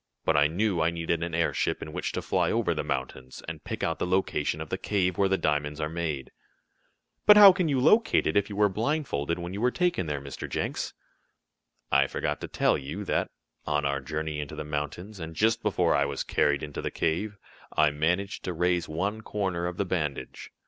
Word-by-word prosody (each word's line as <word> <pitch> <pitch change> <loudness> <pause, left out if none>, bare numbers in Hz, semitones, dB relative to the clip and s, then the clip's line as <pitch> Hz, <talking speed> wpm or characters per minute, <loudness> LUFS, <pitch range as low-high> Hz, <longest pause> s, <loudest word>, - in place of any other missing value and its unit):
But 80 - +3
I 75 0 +5
knew 90 +2 0
I 80 - +3
needed 85 0 -2
an 85 -1 -2
airship 85 -1 0
in 75 - -8
which - - -2
to - - -3
fly - - +1
over - - +1
the - - -2
mountains, 65 0 -5
and - - -6
pick - - -5
out - - -1
the - - -1
location 95 +1 0
of - - -6
the - - -2
cave 90 -4 0
where 95 +1 +2
the 95 - +2
diamonds 75 -1 -1
are 75 -1 -1
made." 80 -6 -3 1.0
"But 210 0 +10
how 200 -2 +11
can 180 -2 0
you 140 -4 +1
locate 220 - +4
it, - - 0
if 100 0 +2
you 100 - -6
were 105 0 +4
blindfolded 105 - -1
when 85 +1 -5
you 100 - -4
were 125 - +4
taken 175 - 0
there, 75 -1 -2
Mr. 70 0 -7
Jenks?" - - -3 1.0
"I 70 0 +4
forgot 75 +1 -3
to - - -4
tell - - +1
you 75 +9 -5
that, - - 0 0.4
on 75 -1 +1
our 70 0 0
journey 75 +1 -3
into 75 -1 -5
the - - -4
mountains, 75 +7 -5
and 80 0 -7
just 115 +5 +2
before 90 -6 +2
I 70 +3 +3
was 70 -1 -3
carried 70 -1 +1
into 75 -1 -5
the - - -2
cave, 100 +6 -1 0.4
I 75 -1 +4
managed 90 +7 -1
to 90 - -2
raise 90 0 0
one 100 +8 -2
corner 95 -5 -2
of 90 0 -5
the 100 - 0
bandage. 80 -6 -3
85 Hz, 215 wpm, -27 LUFS, 75-100 Hz, 1.0 s, how